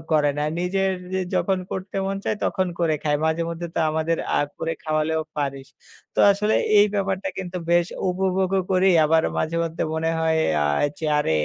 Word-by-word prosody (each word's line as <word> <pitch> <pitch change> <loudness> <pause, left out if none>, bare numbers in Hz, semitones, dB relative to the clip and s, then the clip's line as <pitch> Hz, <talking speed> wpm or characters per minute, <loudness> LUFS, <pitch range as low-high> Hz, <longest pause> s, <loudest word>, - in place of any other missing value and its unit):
করে 150 -2 +4
না। - - 0 0.2
নিজের 190 +2 0 0.4
যখন 190 -1 +1
করতে 190 +1 -5
মন 195 0 -2
চায় 215 - 0
তখন 185 -1 0
করে 165 -2 +2
খায়। 145 -1 +1
মাঝেমধ্যে 165 +1 -1
তো - - -1
আমাদের 160 +1 0 0.2
আ - - +4 0.2
করে 165 0 -2
খাওয়ালেও 155 +1 0
পারিস।" 140 -2 -3 0.5
তো - - -7
আসলে 210 +2 0 0.2
এই 205 - +7
ব্যাপারটা 195 -1 -1
কিন্তু 185 -1 -5
বেশ 175 0 +4 0.2
উপভোগও 190 +1 +1
করি। 185 +1 +4 0.2
আবার 160 +1 +3 0.2
মাঝেমধ্যে 165 0 -1
মনে 160 +1 0
হয় 160 0 +2 0.2
আ - - +1 0.3
যে, 160 - -6
আরে 150 - 0
170 Hz, 170 wpm, -23 LUFS, 160-190 Hz, 0.5 s, এই